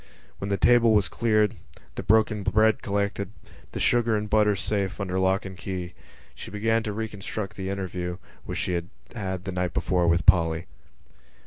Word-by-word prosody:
When 100 - -4
the 100 - +1
table 120 -1 +5
was 105 -2 +3
cleared, 110 -2 +1 0.4
the - - -5
broken 105 0 +3
bread 110 +2 +3
collected, 100 -1 -1 0.4
the - - -5
sugar 120 -2 +2
and 105 0 -3
butter 105 -1 +3
safe 100 0 -1
under 95 -2 -1
lock 95 +2 +1
and 95 -1 -7
key, 90 -2 -5 0.4
she - - -9
began 110 +3 +1
to 110 -2 -3
reconstruct 105 -1 -5
the 95 -1 -4
interview 90 -2 -4 0.3
which - - -5
she 90 - -1
had 85 0 -3 0.3
had 95 -4 -4
the 95 - -4
night 90 -1 -2
before 90 -2 +1
with 85 +1 +2
Polly. 85 -2 +4
100 Hz, 175 wpm, -26 LUFS, 95-110 Hz, 0.4 s, table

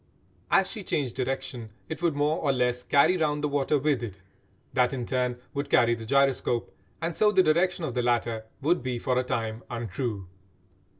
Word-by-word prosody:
As 195 -1 +4
she 210 - -5
changed 135 -9 -1
direction 130 -3 -3 0.2
it 160 - -6
would 170 -4 +1
more 150 +3 +1
or 145 - +1
less 125 -1 0
carry 140 +8 +4
round 150 -2 0
the - - +2
water 145 +1 +1
with 145 -2 +1
it; 100 -5 -6 0.5
that 125 0 +2
in 125 -3 -3
turn 125 0 -1 0.2
would 140 0 -3
carry 120 0 +4
the 115 -1 -6
gyroscope, 135 -2 +1 0.3
and 165 0 -1
so 210 -1 +4
the 190 -2 +5
direction 175 +3 +2
of 130 - -4
the 125 - 0
latter 120 -2 0 0.2
would 170 +2 +2
be 125 -1 -2
for 125 +1 0
a - - 0
time 115 -2 -3
untrue. 115 -3 -4
130 Hz, 190 wpm, -27 LUFS, 120-150 Hz, 0.5 s, the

